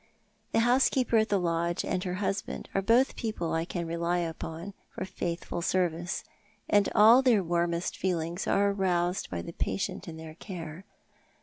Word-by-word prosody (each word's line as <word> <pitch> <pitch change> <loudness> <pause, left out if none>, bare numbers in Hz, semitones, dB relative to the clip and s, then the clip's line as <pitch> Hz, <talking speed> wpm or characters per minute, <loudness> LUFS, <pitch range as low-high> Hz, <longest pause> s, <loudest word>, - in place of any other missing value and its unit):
The 225 - +3
housekeeper 245 0 +3
at 220 0 +2
the 205 - +3
lodge 170 -1 0
and 180 - -1
her 180 -1 -2
husband 195 0 -3
are 195 - +1
both 235 +7 +3
people 215 -8 -3
I 165 0 0
can 175 -1 -4
rely 170 +1 -1
upon 165 +2 -4 0.2
for - - -5
faithful 175 -2 -4
service, 175 -1 0 0.4
and 205 -1 +3
all 225 +5 +8
their 235 -7 +4
warmest 170 0 0
feehngs 175 -1 -2
are 200 0 +3
aroused 180 -2 0
by 85 -2 -4
the - - -8
patient 195 - -3
in 160 -1 -7
their 160 -1 -9
charge. 170 -1 -8
180 Hz, 165 wpm, -29 LUFS, 170-200 Hz, 0.4 s, all